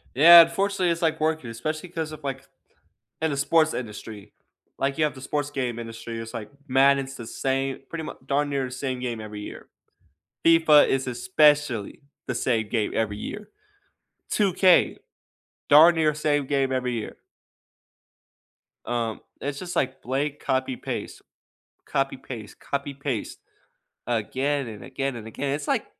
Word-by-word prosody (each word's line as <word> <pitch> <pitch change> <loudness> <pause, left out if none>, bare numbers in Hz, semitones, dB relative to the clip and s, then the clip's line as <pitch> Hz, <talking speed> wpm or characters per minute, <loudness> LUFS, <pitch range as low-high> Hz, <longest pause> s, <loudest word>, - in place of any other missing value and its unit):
Yeah, 170 +5 +11
unfortunately, 185 +2 +1
it's, 170 0 -1
like, 160 -2 +1
working, 155 -5 -1
especially 155 +9 -4
'cause 160 -2 -4
of, 155 -1 -10
like, 135 -1 -5 0.7
in 160 0 +1
the 140 - -2
sports 155 +3 +3
industry. 105 -3 -7 0.5
Like, 135 0 0
you 155 - +3
have 150 -3 0
the 130 - -11
sports 145 +2 -2
game 125 -5 -3
industry, 115 0 -7
it's, 115 +1 -7
like, 105 -2 -6 0.2
Madden's 135 0 +3
the 115 - -8
same 135 +2 -2
pretty 165 -1 -5
much - - -7
darn 145 +2 +1
near 140 -2 -1
the - - -8
same 130 0 -4
game 120 -3 -3
every 105 -1 -7
year. - - -9 0.8
FIFA 165 -3 +6
is 135 0 0
especially 145 - +2 0.3
the 125 - -2
same 115 -3 0
game 110 -2 -1
every 105 -2 -1
year. 210 - -7 0.8
2K, 190 -3 +4 0.7
darn 160 +4 +8
near 155 -2 +3
the - - -9
same 145 -2 +1
game 135 -1 0
every 125 -1 -1
year. 115 -2 -5 1.7
Um, 115 -2 -2 0.2
it's 140 0 -3
just, 180 -1 -6
like, 130 0 -1
blank, 140 +3 -2
copy, 130 -1 -1
paste, - - -6 0.7
copy, 135 0 -1
paste, 115 -5 -9
copy, 140 0 -4
paste. 135 -5 -4 0.7
Again 130 +4 -1
and 105 -2 -9
again 135 -1 -3
and 110 -2 -8
again. 135 +5 -3
It's, 145 0 -5
like, - - +1
135 Hz, 155 wpm, -25 LUFS, 120-150 Hz, 1.7 s, Yeah